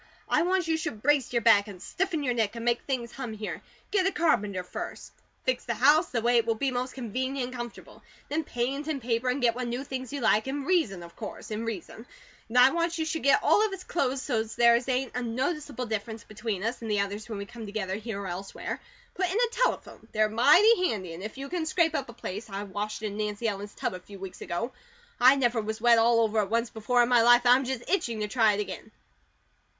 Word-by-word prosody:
I -, -, +3 dB
want 365 Hz, 0 st, +1 dB
you 320 Hz, -1 st, +1 dB
should 220 Hz, -9 st, -5 dB
brace 290 Hz, -1 st, +2 dB
your 235 Hz, -2 st, 0 dB
back, 210 Hz, -2 st, +6 dB
and 195 Hz, -3 st, -9 dB
stiffen 350 Hz, -, -2 dB
your 250 Hz, -3 st, +1 dB
neck, 225 Hz, -2 st, 0 dB
and 230 Hz, 0 st, -5 dB
make 240 Hz, 0 st, +2 dB
things 245 Hz, -4 st, -3 dB
hum 250 Hz, -5 st, -6 dB
here. 215 Hz, 0 st, -5 dB, 0.3 s
Get 385 Hz, -2 st, +3 dB
a -, -, +1 dB
carpenter 205 Hz, -, +1 dB
first. 180 Hz, -, -7 dB, 0.3 s
Fix 255 Hz, -1 st, 0 dB
the 235 Hz, -, -2 dB
house 295 Hz, -, +4 dB
the 230 Hz, -3 st, -2 dB
way 240 Hz, 0 st, +4 dB
it 230 Hz, 0 st, +2 dB
will 225 Hz, -, +2 dB
be 270 Hz, +4 st, -1 dB
most 250 Hz, +1 st, -3 dB
convenient 260 Hz, +1 st, -3 dB
and 255 Hz, -, -9 dB
comfortable. 240 Hz, -1 st, -8 dB, 0.3 s
Then 315 Hz, +2 st, -1 dB
paint 275 Hz, +3 st, -3 dB
and 310 Hz, -3 st, -1 dB
paper, 240 Hz, +1 st, -1 dB
and 250 Hz, +1 st, -1 dB
get 235 Hz, -1 st, +4 dB
what 250 Hz, +1 st, -4 dB
new 245 Hz, +3 st, -3 dB
things 260 Hz, -2 st, -6 dB
you 285 Hz, -, -3 dB
like, 220 Hz, -1 st, +2 dB
in 275 Hz, +1 st, -3 dB
reason 295 Hz, -, +1 dB
of 170 Hz, 0 st, -13 dB
course, 220 Hz, 0 st, -8 dB
in 215 Hz, +2 st, -3 dB
reason 220 Hz, -6 st, -5 dB
and 225 Hz, -, -11 dB, 0.5 s
then 250 Hz, -, +9 dB
I 260 Hz, -, +6 dB
want 335 Hz, 0 st, 0 dB
you 320 Hz, -, -1 dB
should 320 Hz, 0 st, -2 dB
get 280 Hz, -, +4 dB
all 425 Hz, -, +5 dB
of 435 Hz, -, 0 dB
us 375 Hz, -1 st, -7 dB
clothes 270 Hz, -7 st, -1 dB
so's 220 Hz, -4 st, -2 dB
there 235 Hz, 0 st, +5 dB
ain't 260 Hz, 0 st, 0 dB
a 250 Hz, -, -1 dB
noticeable 260 Hz, +3 st, -2 dB
difference 220 Hz, 0 st, -4 dB
between 215 Hz, -3 st, -4 dB
us 230 Hz, +3 st, -2 dB
and 225 Hz, -, -5 dB
the 205 Hz, -1 st, +2 dB
others 205 Hz, +3 st, -4 dB
when 215 Hz, -, -4 dB
we 200 Hz, -, -5 dB
come 225 Hz, +1 st, -9 dB
together 200 Hz, -2 st, -3 dB
here 215 Hz, 0 st, -4 dB
or -, -, -6 dB
elsewhere. 185 Hz, +2 st, -5 dB, 0.3 s
Put 370 Hz, 0 st, 0 dB
in 380 Hz, -, -1 dB
a 480 Hz, -1 st, +3 dB
telephone; -, -, -1 dB
they're 215 Hz, 0 st, +3 dB
mighty 360 Hz, -, +5 dB
handy, 185 Hz, -6 st, -4 dB
and 165 Hz, -, -8 dB
if 215 Hz, +5 st, -7 dB
you 275 Hz, 0 st, -5 dB
can 340 Hz, 0 st, -3 dB
scrape 325 Hz, -1 st, +2 dB
up 275 Hz, -5 st, -2 dB
a -, -, -9 dB
place 215 Hz, -1 st, -6 dB
I 195 Hz, +1 st, -4 dB
washed 205 Hz, +2 st, -5 dB
in 210 Hz, -1 st, -3 dB
Nancy 210 Hz, +1 st, -2 dB
Ellen's 205 Hz, -1 st, -4 dB
tub -, -, -2 dB
a 185 Hz, -, -6 dB
few 200 Hz, +2 st, -12 dB
weeks 190 Hz, -1 st, -9 dB
ago. 230 Hz, +9 st, -3 dB, 0.5 s
I 255 Hz, +3 st, +7 dB
never 240 Hz, -4 st, +1 dB
was 220 Hz, +1 st, -4 dB
wet 235 Hz, 0 st, +5 dB
all 230 Hz, 0 st, +4 dB
over 220 Hz, -1 st, +1 dB
at 200 Hz, -2 st, 0 dB
once 230 Hz, +1 st, 0 dB
before 240 Hz, +3 st, +2 dB
in 235 Hz, -, 0 dB
my 245 Hz, -2 st, +5 dB
life, 240 Hz, +1 st, +6 dB
and 245 Hz, -, +8 dB
I'm 260 Hz, +1 st, +2 dB
just 255 Hz, -2 st, -4 dB
itching 235 Hz, -, 0 dB
to 210 Hz, -, -1 dB
try 220 Hz, -1 st, +3 dB
it 205 Hz, -, -1 dB
again. 205 Hz, -, -7 dB
235 Hz, 250 wpm, -28 LUFS, 215-270 Hz, 0.5 s, then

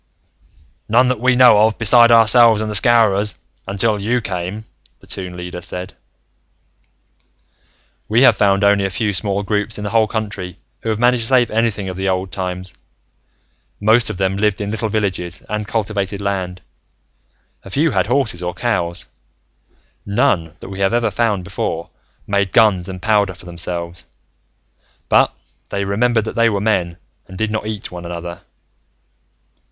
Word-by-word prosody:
"None 125 Hz, +3 st, +4 dB
that 125 Hz, -3 st, -1 dB
we 130 Hz, +2 st, +3 dB
know 125 Hz, -4 st, +6 dB
of, 110 Hz, +1 st, +3 dB
beside 120 Hz, +1 st, +6 dB
ourselves 115 Hz, -1 st, +6 dB
and 110 Hz, 0 st, -3 dB
the -, -, -4 dB
Scowrers, 105 Hz, -2 st, +3 dB, 0.3 s
until 100 Hz, +1 st, 0 dB
you 120 Hz, +5 st, 0 dB
came," 95 Hz, +1 st, -5 dB, 0.3 s
the -, -, -19 dB
Toon 90 Hz, -2 st, -7 dB
Leader 90 Hz, 0 st, -7 dB
said. 90 Hz, +1 st, -4 dB, 2.2 s
"We 115 Hz, +5 st, +4 dB
have 120 Hz, -4 st, +6 dB
found 100 Hz, -1 st, +2 dB
only 100 Hz, 0 st, +3 dB
a -, -, -1 dB
few 100 Hz, +2 st, -2 dB
small 100 Hz, +2 st, -1 dB
groups, 105 Hz, +2 st, -2 dB
in 105 Hz, -, -6 dB
the 100 Hz, -, -4 dB
whole 110 Hz, -1 st, +3 dB
country, 100 Hz, -5 st, -5 dB, 0.2 s
who 115 Hz, -, -5 dB
have 110 Hz, -, 0 dB
managed 120 Hz, +1 st, +2 dB
to -, -, -2 dB
save 125 Hz, -2 st, +3 dB
anything 110 Hz, -3 st, 0 dB
of 90 Hz, -1 st, -6 dB
the 95 Hz, 0 st, -1 dB
Old 95 Hz, 0 st, -2 dB
Times. 90 Hz, -1 st, -5 dB, 1.1 s
Most 110 Hz, +3 st, +3 dB
of 105 Hz, -, -5 dB
them 95 Hz, +1 st, 0 dB
lived 105 Hz, -1 st, +1 dB
in 105 Hz, 0 st, -3 dB
little 110 Hz, 0 st, -2 dB
villages 95 Hz, -5 st, -2 dB
and 105 Hz, 0 st, -4 dB
cultivated 100 Hz, -3 st, -2 dB
land. 95 Hz, -2 st, -3 dB, 1.0 s
A -, -, -11 dB
few 150 Hz, +9 st, +1 dB
had 95 Hz, -3 st, 0 dB
horses 125 Hz, -8 st, 0 dB
or 90 Hz, 0 st, -4 dB
cows. 90 Hz, -8 st, -2 dB, 1.0 s
None, 100 Hz, -, 0 dB
that -, -, -9 dB
we 95 Hz, 0 st, -8 dB
have 95 Hz, +4 st, +1 dB
ever 115 Hz, -2 st, +1 dB
found 105 Hz, -3 st, 0 dB
before, 85 Hz, -1 st, -4 dB, 0.3 s
made 100 Hz, -1 st, -1 dB
guns 100 Hz, -6 st, +3 dB
and 95 Hz, -1 st, -7 dB
powder 105 Hz, -4 st, +2 dB
for 90 Hz, -, -16 dB
themselves. 85 Hz, 0 st, -6 dB, 1.0 s
But -, -, +4 dB, 0.4 s
they 100 Hz, -, -2 dB
remembered 110 Hz, +3 st, +1 dB
that -, -, -5 dB
they 115 Hz, 0 st, +3 dB
were 100 Hz, -2 st, -1 dB
men, 90 Hz, -5 st, 0 dB, 0.3 s
and 95 Hz, -, -11 dB
did 110 Hz, +1 st, -1 dB
not 110 Hz, -1 st, -3 dB
eat 110 Hz, -2 st, -5 dB
one 90 Hz, -1 st, -8 dB
another. 85 Hz, 0 st, -7 dB
100 Hz, 165 wpm, -18 LUFS, 95-110 Hz, 2.2 s, know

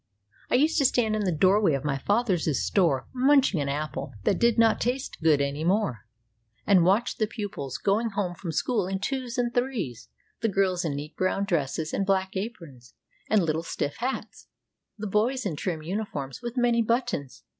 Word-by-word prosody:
I -, -, +2 dB
used 310 Hz, +5 st, +3 dB
to 280 Hz, -, +3 dB
stand 225 Hz, -4 st, +2 dB
in 210 Hz, -1 st, -1 dB
the 185 Hz, -, +1 dB
doorway 185 Hz, +2 st, +3 dB
of 135 Hz, -, -4 dB
my 140 Hz, -2 st, 0 dB
father's 190 Hz, -, +1 dB
store 165 Hz, -9 st, +1 dB
munching 260 Hz, -, +3 dB
an 140 Hz, -, -2 dB
apple 140 Hz, -3 st, -4 dB
that -, -, +1 dB
did 235 Hz, -1 st, +3 dB
not 225 Hz, -1 st, +4 dB
taste 255 Hz, -3 st, -2 dB
good 155 Hz, -3 st, +4 dB
any 140 Hz, +2 st, -1 dB
more, 175 Hz, -, 0 dB, 0.6 s
and 185 Hz, -4 st, +5 dB
watch 200 Hz, +7 st, +2 dB
the 215 Hz, -, +1 dB
pupils 205 Hz, -, -5 dB
going 215 Hz, +4 st, +1 dB
home 200 Hz, -4 st, -2 dB
from 175 Hz, -1 st, -6 dB
school 210 Hz, +2 st, 0 dB
in 190 Hz, 0 st, -1 dB
twos 255 Hz, +3 st, -3 dB
and 240 Hz, -1 st, 0 dB
threes; 245 Hz, -, -2 dB, 0.3 s
the 225 Hz, -, +1 dB
girls 190 Hz, -2 st, +1 dB
in 155 Hz, -4 st, -2 dB
neat 150 Hz, +2 st, -7 dB
brown 190 Hz, +2 st, 0 dB
dresses 160 Hz, -3 st, -1 dB
and 195 Hz, -, -1 dB
black 190 Hz, 0 st, +1 dB
aprons 165 Hz, -, -7 dB, 0.3 s
and 215 Hz, -3 st, +4 dB
little 160 Hz, 0 st, 0 dB
stiff 145 Hz, -3 st, -3 dB
hats, 255 Hz, +3 st, -4 dB, 0.5 s
the 215 Hz, -, -5 dB
boys 225 Hz, +5 st, 0 dB
in 180 Hz, -6 st, -1 dB
trim 160 Hz, 0 st, -3 dB
uniforms 155 Hz, -, -4 dB
with 240 Hz, +1 st, -6 dB
many 240 Hz, -1 st, +3 dB
buttons. 230 Hz, -, -2 dB
195 Hz, 185 wpm, -26 LUFS, 155-235 Hz, 0.6 s, and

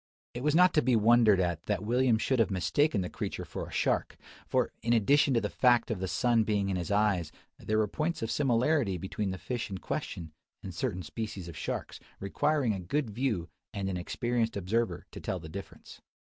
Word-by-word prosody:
It 120 Hz, -, -5 dB
was 150 Hz, +2 st, +2 dB
not 180 Hz, +1 st, +6 dB
to 150 Hz, -, +4 dB
be 125 Hz, 0 st, +3 dB
wondered 110 Hz, -2 st, +5 dB
at 85 Hz, -3 st, 0 dB
that 105 Hz, 0 st, -1 dB
William 120 Hz, 0 st, +3 dB
should 125 Hz, +3 st, 0 dB
have 115 Hz, -, +3 dB
mistaken 100 Hz, -, +1 dB
the 90 Hz, -, -2 dB
creature -, -, -4 dB
for -, -, -6 dB
a -, -, -12 dB
shark: -, -, 0 dB, 0.3 s
for, -, -, +1 dB
in 115 Hz, +2 st, +1 dB
addition 135 Hz, +4 st, +4 dB
to 115 Hz, -, +3 dB
the 105 Hz, -, -1 dB
fact 120 Hz, -2 st, +3 dB
of 105 Hz, -, -2 dB
the 95 Hz, -, -2 dB
sun 120 Hz, +3 st, +2 dB
being 105 Hz, -2 st, 0 dB
in 95 Hz, -, 0 dB
his 90 Hz, +2 st, -3 dB
eyes, 100 Hz, -6 st, +1 dB, 0.3 s
there 110 Hz, -, -1 dB
were 110 Hz, -1 st, +2 dB
points 155 Hz, -, -2 dB
of 115 Hz, -, -2 dB
similarity 130 Hz, -, +2 dB
between 95 Hz, +3 st, -3 dB
the 95 Hz, -, -3 dB
fish 120 Hz, +3 st, -4 dB
in 95 Hz, -, -4 dB
question, 85 Hz, -3 st, -5 dB, 0.3 s
and 95 Hz, -, -6 dB
certain 95 Hz, -4 st, -2 dB
species 100 Hz, 0 st, -5 dB
of 85 Hz, -, -8 dB
sharks, -, -, -4 dB, 0.2 s
requiring 125 Hz, +5 st, +1 dB
a 95 Hz, -, -4 dB
good 110 Hz, -, -2 dB
view 110 Hz, -7 st, -1 dB, 0.3 s
and 100 Hz, -1 st, -2 dB
an 90 Hz, -, -2 dB
experienced 115 Hz, +5 st, -1 dB
observer 100 Hz, 0 st, -1 dB
to -, -, -8 dB
tell 95 Hz, -, -3 dB
the 80 Hz, -, -9 dB
difference. 100 Hz, +4 st, -10 dB
110 Hz, 210 wpm, -30 LUFS, 95-125 Hz, 0.3 s, not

